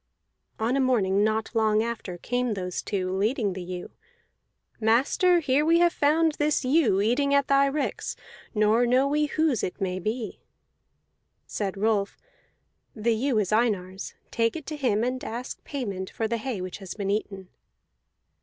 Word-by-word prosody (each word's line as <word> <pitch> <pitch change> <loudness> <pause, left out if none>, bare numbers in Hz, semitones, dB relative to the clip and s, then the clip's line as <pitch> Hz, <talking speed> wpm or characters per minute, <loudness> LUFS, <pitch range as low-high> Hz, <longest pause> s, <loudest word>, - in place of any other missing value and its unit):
On 230 +4 0
a - - +2
morning 205 -7 +2
not 220 +1 0
long 220 -1 +2
after 225 -6 -5
came 245 +3 -1
those 180 -2 -3
two, 185 -2 -2
leading 210 0 0
the 185 - -6
ewe. 180 0 -6 0.9
"Master, 275 - +3
here 275 -2 +2
have 300 - +1
we 340 +1 +5
found 320 +1 +2
this 295 -2 +1
ewe 255 - +3
eating 280 +6 +2
at 280 0 +3
thy 275 0 +4
ricks, 285 +1 -2 0.4
nor 215 +3 +3
know 255 +3 +3
we 300 +1 +1
whose 310 -5 +1
it 180 - -4
may 185 -2 -2
be." 220 +4 -4 1.1
Said 200 -2 -3
Rolf: 205 -1 0 0.8
"The 230 +1 +1
ewe 245 +2 0
is 205 -3 0
Einar's. 200 -4 0 0.2
Take 230 -1 +1
it 315 -3 -6
to 310 - -5
him, 235 -7 +1
and 255 +1 -2
ask 240 +3 -6
payment 200 -10 -4
for 225 - -2
the 235 +1 -1
hay 225 -3 -4
which 185 +1 -6
has 195 -3 -7
been 200 -2 -2
eaten." 195 -3 -3
225 Hz, 165 wpm, -26 LUFS, 200-275 Hz, 1.1 s, we